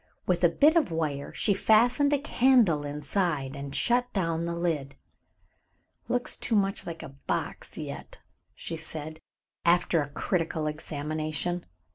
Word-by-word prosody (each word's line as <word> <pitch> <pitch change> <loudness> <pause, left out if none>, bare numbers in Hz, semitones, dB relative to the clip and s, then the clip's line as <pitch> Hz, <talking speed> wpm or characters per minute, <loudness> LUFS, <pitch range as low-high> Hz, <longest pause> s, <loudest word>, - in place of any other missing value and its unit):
With 180 -1 0
a 175 - +7
bit 300 - +4
of 325 -5 +3
wire 155 -4 -2
she 205 - +1
fastened 240 +8 +4
a 290 - +4
candle 245 - +3
inside 145 -1 -2
and 140 0 -6
shut 245 +1 +2
down 165 -4 0
the 170 0 -2
lid. 160 -5 -2 1.1
"Looks 245 0 +1
too 230 - 0
much 195 -1 +1
like 165 -1 -6
a 160 - -7
box 135 +1 -5
yet," - - -7 0.4
she 165 - -5
said, 155 0 -5 0.4
after 170 -1 +3
a 145 - -4
critical 160 +1 -1
examination. 155 +3 -3
165 Hz, 140 wpm, -28 LUFS, 150-205 Hz, 1.1 s, a